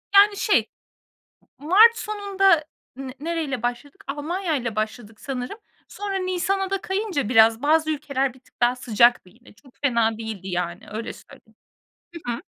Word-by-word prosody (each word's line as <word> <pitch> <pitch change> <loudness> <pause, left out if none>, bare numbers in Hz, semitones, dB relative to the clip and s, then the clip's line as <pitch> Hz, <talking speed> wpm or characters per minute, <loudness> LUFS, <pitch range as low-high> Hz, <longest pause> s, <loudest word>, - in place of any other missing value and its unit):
Yani, 405 0 +7
şey 420 - +2 0.9
mart 425 +10 +6
sonunda 390 -6 +2 0.3
n 265 -1 -7
nereyle 310 -6 -3
başladık? 245 +4 -4
Almanya 315 +4 -2
ile 235 -5 -3
başladık 215 0 -4
sanırım, 265 - -5 0.3
sonra 405 -1 -5
nisana 375 +1 -1
da 390 -1 -2
kayınca 380 - -2
biraz, 225 0 +5
bazı 315 +1 +2
ülkeler 275 -3 -1
bir 260 - -19
tık 250 - -30
daha 240 +1 +3
sıcaktı 235 -4 +3
yine 235 +5 -20
çok 255 +4 -21
fena 230 -5 +2
değildi, 220 -4 -6
yani, 175 -1 -4
öyle 220 +2 -5
söyleyeyim. 220 0 -18 0.7
Hı 240 - -1
hı. 235 - -5
275 Hz, 150 wpm, -23 LUFS, 230-370 Hz, 0.9 s, Yani